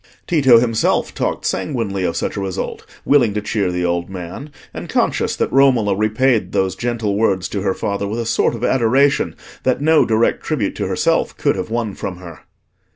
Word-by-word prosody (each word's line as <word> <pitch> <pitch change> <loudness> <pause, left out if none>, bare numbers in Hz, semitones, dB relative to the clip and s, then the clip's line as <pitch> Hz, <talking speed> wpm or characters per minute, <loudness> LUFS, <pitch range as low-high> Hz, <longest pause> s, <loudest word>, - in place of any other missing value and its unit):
Tito 135 -8 +5
himself 115 -1 +1
talked - - -2
sanguinely 100 0 -2
of 85 - -1
such - - -2
a 100 - -3
result, 95 -2 -5 0.2
willing 120 -8 +3
to 105 - -1
cheer 100 -3 -1
the 90 0 -1
old 85 0 -1
man, 95 - -7 0.2
and - - -7
conscious - - 0
that - - -1
Romola 125 -7 +4
repaid 110 -1 +1
those 95 -1 0
gentle 115 -4 -2
words 95 -4 +1
to 100 - -3
her 95 -1 0
father 100 0 -2
with 105 +3 -3
a 115 - -2
sort 115 - +1
of 115 - -7
adoration 130 +3 +2 0.3
that 130 -1 +1
no 155 +2 +4
direct 115 +1 +1
tribute - - -2
to - - -2
herself - - 0
could - - +1
have - - -4
won 115 -3 -2
from 90 -1 -6
her. 85 -4 -11
110 Hz, 190 wpm, -19 LUFS, 95-120 Hz, 0.3 s, Tito